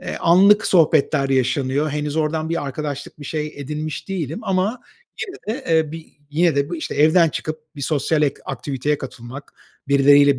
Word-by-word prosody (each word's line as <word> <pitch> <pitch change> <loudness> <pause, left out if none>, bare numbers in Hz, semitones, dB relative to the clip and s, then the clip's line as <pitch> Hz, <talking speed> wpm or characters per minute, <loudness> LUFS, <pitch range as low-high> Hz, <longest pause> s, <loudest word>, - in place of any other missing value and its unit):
eee, - - -5
anlık 195 +5 +5
sohbetler 155 -4 +3
yaşanıyor. 135 +3 +1
Henüz 150 +1 -3
oradan 155 0 0
bir 165 -3 -2
arkadaşlık, 145 +1 -5
bir - - -8
şey 150 +1 -3
edinmiş 150 +5 -5
değilim 165 -5 -3
ama 200 +4 0 0.5
yine 245 - -5
de, 270 - -12
eee, 160 -2 +2
bi 165 -1 -8 0.2
yine 160 0 +2
de 140 0 +1
bu, 175 - -3
işte, 155 - -5
evden 160 +3 +5
çıkıp 155 0 -5 0.2
bir 140 - -6
sosyal 150 +2 +1
et 145 - 0
aktiviteye 140 +2 -2
katılmak, 130 +1 -9 0.4
birileriyle 140 0 +5
150 Hz, 170 wpm, -21 LUFS, 140-165 Hz, 0.5 s, anlık